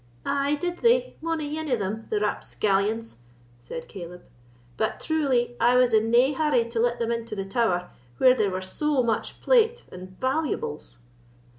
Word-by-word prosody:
"Ay 280 Hz, +1 st, +1 dB
did 350 Hz, +3 st, -4 dB
they, -, -, +2 dB
mony 315 Hz, -2 st, -2 dB
ane 315 Hz, -1 st, -4 dB
of 250 Hz, -, +2 dB
them, 210 Hz, +2 st, -4 dB
the 425 Hz, -, 0 dB
rapscallions!" 210 Hz, -, -1 dB, 0.4 s
said 160 Hz, +7 st, -8 dB
Caleb; 180 Hz, -2 st, -9 dB, 0.5 s
"but 220 Hz, -, -1 dB
truly 265 Hz, -7 st, 0 dB
I 240 Hz, +2 st, +4 dB
was 250 Hz, -2 st, +4 dB
in 220 Hz, +1 st, +3 dB
nae 250 Hz, +5 st, +4 dB
hurry 280 Hz, -5 st, +2 dB
to 230 Hz, -1 st, -3 dB
let 240 Hz, +1 st, +1 dB
them 235 Hz, -1 st, -1 dB
into 230 Hz, -2 st, -3 dB
the 195 Hz, -1 st, -4 dB
Tower, 195 Hz, -4 st, 0 dB, 0.3 s
where 255 Hz, -1 st, +6 dB
there 210 Hz, -5 st, +1 dB
were 185 Hz, 0 st, -4 dB
so 285 Hz, +7 st, 0 dB
much 230 Hz, -2 st, -2 dB
plate 475 Hz, -1 st, +3 dB
and 185 Hz, +1 st, -11 dB
valuables." 260 Hz, -, -2 dB
240 Hz, 165 wpm, -25 LUFS, 210-295 Hz, 0.5 s, where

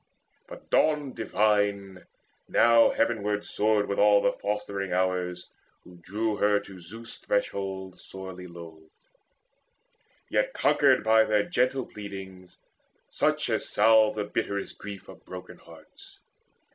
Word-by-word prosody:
But -, -, -13 dB
Dawn 150 Hz, -3 st, +2 dB
divine 100 Hz, -3 st, 0 dB, 0.4 s
Now 115 Hz, 0 st, +5 dB
heavenward 105 Hz, -3 st, -1 dB
soared 105 Hz, -1 st, +1 dB
with 100 Hz, -, -2 dB
the -, -, +4 dB
all 105 Hz, -1 st, +4 dB
fostering 100 Hz, -2 st, -4 dB
Hours, 90 Hz, -1 st, -1 dB, 0.4 s
Who 90 Hz, -, -15 dB
drew 105 Hz, +5 st, -3 dB
her 105 Hz, 0 st, +3 dB
to 100 Hz, -2 st, -12 dB
Zeus' 110 Hz, +7 st, -10 dB
threshold, 95 Hz, -2 st, -3 dB
sorely 95 Hz, -1 st, -9 dB
loth, 85 Hz, -2 st, -11 dB, 1.5 s
Yet -, -, 0 dB
conquered -, -, +3 dB
by 110 Hz, 0 st, +5 dB
their 105 Hz, -1 st, +2 dB
gentle 130 Hz, +4 st, 0 dB
pleadings, 95 Hz, -3 st, -10 dB, 0.5 s
such -, -, 0 dB
As -, -, -1 dB
salve 110 Hz, -1 st, +4 dB
the 105 Hz, -, -2 dB
bitterest 100 Hz, -1 st, -4 dB
grief 100 Hz, -1 st, -9 dB
of -, -, -14 dB
broken 90 Hz, 0 st, -10 dB
hearts. -, -, -17 dB
100 Hz, 120 wpm, -27 LUFS, 95-110 Hz, 1.5 s, Now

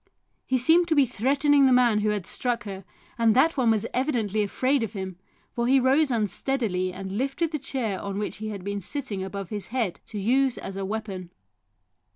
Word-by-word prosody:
He 260 Hz, -, +2 dB
seemed 325 Hz, +7 st, +4 dB
to 320 Hz, -, +2 dB
be 285 Hz, -2 st, +5 dB
threatening 275 Hz, +4 st, +3 dB
the -, -, +3 dB
man 245 Hz, -4 st, +4 dB
who 210 Hz, 0 st, +1 dB
had 205 Hz, -4 st, -1 dB
struck 240 Hz, -2 st, -2 dB
her, 195 Hz, -2 st, -7 dB, 0.4 s
and 225 Hz, -1 st, +4 dB
that 315 Hz, +6 st, +4 dB
one 255 Hz, -5 st, +2 dB
was 220 Hz, -1 st, +2 dB
evidently 230 Hz, -6 st, 0 dB
afraid 255 Hz, +6 st, +1 dB
of 225 Hz, -2 st, -3 dB
him, 190 Hz, -3 st, -6 dB, 0.3 s
for 235 Hz, 0 st, -1 dB
he 270 Hz, +1 st, +5 dB
rose 270 Hz, +4 st, +3 dB
unsteadily 215 Hz, -3 st, -1 dB
and 190 Hz, +2 st, -5 dB
lifted 275 Hz, +5 st, -1 dB
the 305 Hz, -, -2 dB
chair 240 Hz, -7 st, -3 dB
on 200 Hz, -1 st, -4 dB
which 205 Hz, -2 st, -3 dB
he 215 Hz, +1 st, -5 dB
had 200 Hz, -3 st, -6 dB
been 200 Hz, +1 st, -3 dB
sitting 215 Hz, -3 st, -4 dB
above 195 Hz, 0 st, -6 dB
his 205 Hz, -2 st, -4 dB
head 230 Hz, -7 st, -2 dB
to 215 Hz, -, -7 dB
use 255 Hz, +5 st, +2 dB
as 195 Hz, -, -6 dB
a 195 Hz, 0 st, -3 dB
weapon. 195 Hz, -4 st, -5 dB
225 Hz, 200 wpm, -26 LUFS, 200-265 Hz, 0.4 s, be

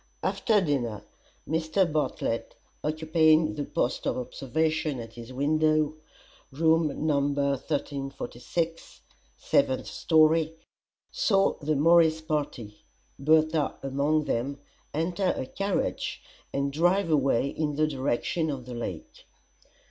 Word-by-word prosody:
After 220 Hz, -4 st, +2 dB
dinner 120 Hz, -, -1 dB, 0.4 s
Mr. 160 Hz, +4 st, +1 dB
Bartlett, 150 Hz, -7 st, -2 dB, 0.3 s
occupying 155 Hz, 0 st, +3 dB
the 145 Hz, -2 st, -3 dB
post 120 Hz, -, -1 dB
of -, -, 0 dB
observation 150 Hz, +3 st, -1 dB
at 115 Hz, -1 st, -8 dB
his 120 Hz, +1 st, -10 dB
window 155 Hz, +2 st, +2 dB, 0.6 s
(room 160 Hz, +1 st, +1 dB
No. 150 Hz, -3 st, +3 dB
1346, 140 Hz, +2 st, -2 dB, 0.4 s
seventh 130 Hz, -, +1 dB
story), 160 Hz, 0 st, +3 dB, 0.6 s
saw 195 Hz, -2 st, +2 dB
the 150 Hz, +1 st, 0 dB
Morris 160 Hz, +1 st, +5 dB
party 145 Hz, -9 st, -4 dB, 0.4 s
Bertha 155 Hz, +1 st, +2 dB
among 140 Hz, +3 st, +1 dB
them 140 Hz, +1 st, -2 dB, 0.3 s
enter 175 Hz, +4 st, 0 dB
a -, -, -3 dB
carriage 195 Hz, +7 st, -2 dB, 0.3 s
and 140 Hz, 0 st, -1 dB
drive 175 Hz, +3 st, +2 dB
away 140 Hz, -3 st, +2 dB
in 150 Hz, 0 st, -2 dB
the 155 Hz, +1 st, +2 dB
direction 145 Hz, +3 st, -1 dB
of 135 Hz, -4 st, -4 dB
the 125 Hz, -, -7 dB
Lake. 105 Hz, -8 st, -7 dB
155 Hz, 110 wpm, -27 LUFS, 135-160 Hz, 0.6 s, Morris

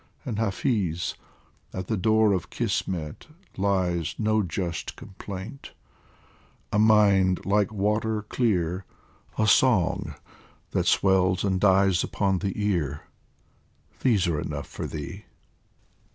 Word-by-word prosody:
And, 115 Hz, -6 st, -3 dB
Hafiz, 100 Hz, -, 0 dB, 0.6 s
at 95 Hz, -1 st, -4 dB
the 110 Hz, -, -1 dB
door 110 Hz, +1 st, +3 dB
of 90 Hz, -4 st, -2 dB
Kismet 80 Hz, -5 st, -3 dB, 0.3 s
lies 95 Hz, -4 st, 0 dB
No 110 Hz, -1 st, +2 dB
just 85 Hz, -2 st, -4 dB
complaint 100 Hz, +6 st, -9 dB, 1.0 s
a 105 Hz, -, +3 dB
mind 100 Hz, -4 st, +4 dB
like 100 Hz, 0 st, +2 dB
water 105 Hz, +1 st, 0 dB
clear, 95 Hz, -6 st, 0 dB, 0.5 s
A 110 Hz, -, +2 dB
song 110 Hz, -5 st, +3 dB, 0.6 s
that -, -, 0 dB
swells 95 Hz, -1 st, +3 dB
and 95 Hz, -2 st, 0 dB
dies 95 Hz, -3 st, +4 dB
upon 95 Hz, -2 st, 0 dB
the 95 Hz, 0 st, -2 dB
ear, 85 Hz, -9 st, -1 dB, 1.0 s
These 110 Hz, -8 st, +2 dB
are 85 Hz, -4 st, 0 dB
enough -, -, -4 dB
for -, -, -6 dB
thee 85 Hz, +7 st, -7 dB
95 Hz, 110 wpm, -26 LUFS, 90-105 Hz, 1.0 s, mind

